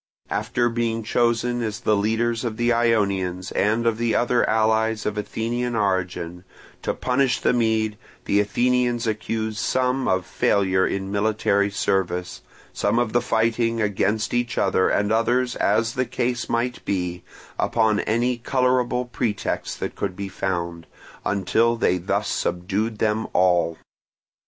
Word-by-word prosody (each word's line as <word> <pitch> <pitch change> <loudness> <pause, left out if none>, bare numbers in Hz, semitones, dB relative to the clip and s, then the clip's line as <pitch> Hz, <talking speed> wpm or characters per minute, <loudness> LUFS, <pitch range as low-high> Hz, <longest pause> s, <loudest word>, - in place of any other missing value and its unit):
After 120 -1 0
being 115 -1 -1
chosen 120 +2 +1
as 110 -3 -3
the 105 - +2
leaders 115 +3 0
of 115 -3 -3
the 120 0 +2
Ionians 100 -6 0
and 110 +3 +1
of 115 -1 +1
the 115 -1 +1
other 120 0 +2
allies 110 0 +1
of 105 - -1
Athenian 115 +3 -2
origin, 90 -4 -1 0.4
to - - -2
punish 125 0 +1
the - - +2
Mede, 110 -3 +1 0.3
the 100 - +2
Athenians 120 +3 +1
accused 110 0 -2
some 130 0 0
of 95 -1 +1
failure 95 -2 +2
in 95 0 -3
military 100 -1 +1
service, 90 -2 -1 0.3
some - - 0
of 120 -2 +1
fighting 115 +1 +1
against 105 +1 0
each 120 0 -1
other, 95 -1 +2
and 105 +1 +1
others, 120 +2 +1
as 115 +3 +1
the 130 -2 0
case 120 0 -2
might 120 +1 -1
be, 90 -2 -2 0.4
upon 110 -2 +2
any 120 +2 0
colourable 125 0 +1
pretext 115 -3 -3
that - - -3
could 95 -2 -3
be 100 0 -5
found, 85 -3 -3 0.4
until 110 +4 +1
they 90 -5 +1
thus 90 - -1
subdued 100 +6 -1
them 110 +1 0
all. 90 -2 +2
110 Hz, 140 wpm, -23 LUFS, 100-120 Hz, 0.4 s, the